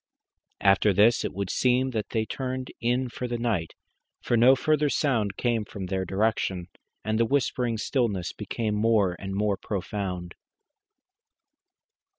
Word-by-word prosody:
After 100 Hz, +1 st, +4 dB
this 105 Hz, +5 st, +4 dB
it -, -, -2 dB
would 100 Hz, 0 st, -3 dB
seem 130 Hz, +1 st, +2 dB
that 110 Hz, -4 st, -3 dB
they 110 Hz, -1 st, 0 dB
turned 130 Hz, +1 st, -4 dB
in 125 Hz, +2 st, +1 dB
for 125 Hz, +1 st, -5 dB
the 120 Hz, 0 st, -2 dB
night, 110 Hz, -9 st, -2 dB, 0.4 s
for 120 Hz, -, 0 dB
no 125 Hz, +3 st, +6 dB
further 150 Hz, +2 st, +1 dB
sound 110 Hz, -10 st, 0 dB
came 120 Hz, -3 st, 0 dB
from 100 Hz, -2 st, -7 dB
their 95 Hz, 0 st, -2 dB
direction, 95 Hz, -2 st, -1 dB, 0.4 s
and 110 Hz, 0 st, 0 dB
the -, -, +5 dB
whispering 125 Hz, -2 st, 0 dB
stillness 105 Hz, -7 st, -1 dB
became 105 Hz, +1 st, -3 dB
more 105 Hz, -4 st, +2 dB
and 95 Hz, 0 st, -5 dB
more 100 Hz, -1 st, +1 dB
profound. 95 Hz, -3 st, -4 dB
110 Hz, 145 wpm, -26 LUFS, 100-125 Hz, 0.4 s, no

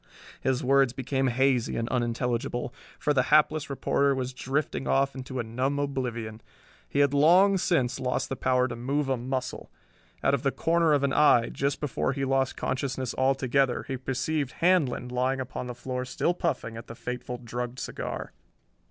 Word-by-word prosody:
His 130 Hz, -1 st, 0 dB
words 135 Hz, -1 st, +4 dB
became 135 Hz, +1 st, -1 dB
hazy 130 Hz, -1 st, +1 dB
and 115 Hz, -, -1 dB
unintelligible, 120 Hz, +1 st, -1 dB, 0.2 s
for 150 Hz, -, +1 dB
the 130 Hz, -, +4 dB
hapless 155 Hz, 0 st, +3 dB
reporter 140 Hz, 0 st, +1 dB
was 130 Hz, -1 st, -3 dB
drifting 135 Hz, +2 st, -2 dB
off 135 Hz, 0 st, +2 dB
into 130 Hz, 0 st, -7 dB
a -, -, 0 dB
numb 130 Hz, +5 st, -1 dB
oblivion. 120 Hz, -6 st, -3 dB, 0.5 s
He 140 Hz, -, +2 dB
had 140 Hz, -1 st, +3 dB
long 180 Hz, +7 st, +5 dB
since 135 Hz, -9 st, +1 dB
lost 125 Hz, -1 st, -1 dB
the 135 Hz, -, -3 dB
power 125 Hz, -1 st, +2 dB
to 120 Hz, -, -5 dB
move 135 Hz, +4 st, -1 dB
a 135 Hz, -, +2 dB
muscle. 130 Hz, +1 st, -4 dB, 0.5 s
Out 135 Hz, -, +3 dB
of 140 Hz, -, +1 dB
the 135 Hz, -, +1 dB
corner 165 Hz, 0 st, +2 dB
of 140 Hz, -1 st, +2 dB
an 140 Hz, -1 st, +1 dB
eye, 125 Hz, -6 st, +5 dB
just 140 Hz, +1 st, -1 dB
before 140 Hz, -2 st, -1 dB
he 135 Hz, 0 st, -2 dB
lost 135 Hz, 0 st, 0 dB
consciousness 130 Hz, -2 st, -2 dB
altogether, 135 Hz, -1 st, +1 dB
he 135 Hz, -, -2 dB
perceived 135 Hz, +2 st, -2 dB
Handlon 165 Hz, -9 st, +2 dB
lying 130 Hz, +2 st, 0 dB
upon 130 Hz, -1 st, -5 dB
the 125 Hz, -, -6 dB
floor 125 Hz, +1 st, -4 dB
still 130 Hz, +7 st, 0 dB
puffing 115 Hz, -9 st, -2 dB
at 115 Hz, -, -9 dB
the 115 Hz, -, -8 dB
fateful 125 Hz, +1 st, -5 dB
drugged 120 Hz, +1 st, -5 dB
cigar. -, -, -5 dB
130 Hz, 175 wpm, -27 LUFS, 125-140 Hz, 0.5 s, long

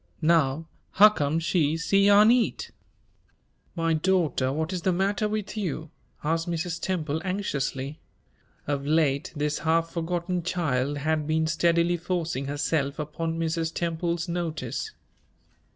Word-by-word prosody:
Now, 160 Hz, -1 st, +2 dB, 0.3 s
huccome 175 Hz, -8 st, +5 dB
she 160 Hz, -2 st, +1 dB
c'yarn 200 Hz, +5 st, +5 dB
eat?" 245 Hz, -1 st, 0 dB, 1.0 s
"My 165 Hz, -1 st, +1 dB
daughter, 155 Hz, -6 st, +1 dB
what 160 Hz, +5 st, -2 dB
is 180 Hz, -, -2 dB
the 185 Hz, -, +2 dB
matter 195 Hz, +3 st, 0 dB
with 210 Hz, -1 st, -3 dB
you?" 165 Hz, -6 st, -3 dB, 0.3 s
asked 165 Hz, +3 st, 0 dB
Mrs. 170 Hz, 0 st, -3 dB
Temple, 160 Hz, -4 st, -2 dB
anxiously. 150 Hz, -7 st, -3 dB, 0.7 s
Of 140 Hz, -1 st, -2 dB
late 150 Hz, -2 st, +1 dB
this 150 Hz, 0 st, -1 dB
half 165 Hz, +1 st, +1 dB
forgotten 175 Hz, +1 st, -2 dB
child 145 Hz, -6 st, -1 dB
had 155 Hz, +1 st, -1 dB
been 160 Hz, 0 st, +1 dB
steadily 170 Hz, +2 st, +2 dB
forcing 170 Hz, -5 st, -2 dB
herself 145 Hz, 0 st, -1 dB
upon 160 Hz, +2 st, -3 dB
Mrs. 165 Hz, 0 st, -1 dB
Temple's 170 Hz, 0 st, -1 dB
notice. 160 Hz, -8 st, -3 dB
165 Hz, 120 wpm, -26 LUFS, 150-175 Hz, 1.0 s, huccome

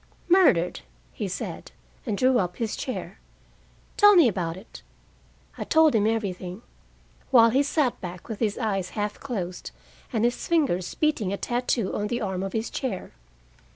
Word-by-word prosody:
"Murdered," 310 Hz, -, +4 dB, 0.3 s
he -, -, -3 dB
said, -, -, -6 dB, 0.4 s
and 200 Hz, -, -1 dB
drew 255 Hz, +1 st, +3 dB
up 180 Hz, -2 st, -2 dB
his 225 Hz, -2 st, -3 dB
chair. 255 Hz, -, -5 dB, 0.8 s
"Tell 415 Hz, -1 st, +7 dB
me 335 Hz, -7 st, +7 dB
about 175 Hz, -5 st, -2 dB
it." 195 Hz, -, -12 dB, 0.8 s
I -, -, -1 dB
told 320 Hz, -1 st, +4 dB
him 215 Hz, -2 st, +3 dB
everything, 195 Hz, -2 st, -3 dB, 0.7 s
while 230 Hz, -3 st, +6 dB
he 265 Hz, +4 st, +3 dB
sat 285 Hz, -3 st, 0 dB
back 180 Hz, -2 st, -8 dB
with 220 Hz, -3 st, -6 dB
his 215 Hz, -3 st, 0 dB
eyes 195 Hz, -6 st, -1 dB
half 210 Hz, 0 st, -2 dB
closed, 185 Hz, -9 st, -5 dB, 0.4 s
and 225 Hz, 0 st, +1 dB
his 240 Hz, -, -1 dB
fingers 275 Hz, -, +1 dB
beating 295 Hz, -11 st, 0 dB
a 200 Hz, -, -2 dB
tattoo 240 Hz, -4 st, -1 dB
on 205 Hz, -, -1 dB
the 240 Hz, +2 st, -2 dB
arm 190 Hz, -5 st, -2 dB
of 195 Hz, -1 st, -4 dB
his 225 Hz, 0 st, -2 dB
chair. 240 Hz, -9 st, -4 dB
220 Hz, 160 wpm, -25 LUFS, 190-255 Hz, 0.8 s, Tell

